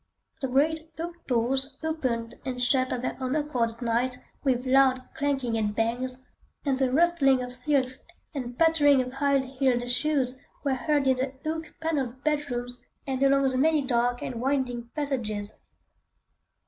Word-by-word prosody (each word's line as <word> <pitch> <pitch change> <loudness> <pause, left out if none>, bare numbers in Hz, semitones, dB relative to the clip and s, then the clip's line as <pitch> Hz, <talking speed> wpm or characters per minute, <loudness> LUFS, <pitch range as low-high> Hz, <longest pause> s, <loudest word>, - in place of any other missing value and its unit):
The 265 - 0
great 310 +5 +1
oak 340 +1 -7
doors 265 +3 +1
opened 250 -8 -2
and 255 -1 -4
shut 255 +1 +2
of 250 - -2
their - - -2
own 260 +2 -1
accord 290 -6 0
at 230 +1 -14
night 240 +2 0 0.3
with 255 -2 +1
loud 260 -1 +4
clanging 270 -5 -1
and 210 -1 -1
bangs, 250 +3 0 0.4
and 275 -2 +2
the 260 -1 +1
rustling 275 -4 +4
of 250 0 -4
silks 255 0 0 0.3
and 250 -4 -5
pattering 305 -4 +5
of 255 0 -8
high 280 0 +2
heeled 260 -2 0
shoes 260 -1 0 0.2
were 280 -2 +1
heard 275 +3 +1
in 260 -1 +3
the 260 +1 -2
oak 320 0 -4
panelled 275 -5 -2
bedrooms 245 -5 -1 0.3
and 265 -1 -2
along 275 0 +4
the 255 0 -1
many 310 0 +3
dark 245 -1 +1
and 235 -2 -4
winding 250 -3 -1
passages. 225 -8 -2
260 Hz, 160 wpm, -27 LUFS, 245-285 Hz, 0.4 s, pattering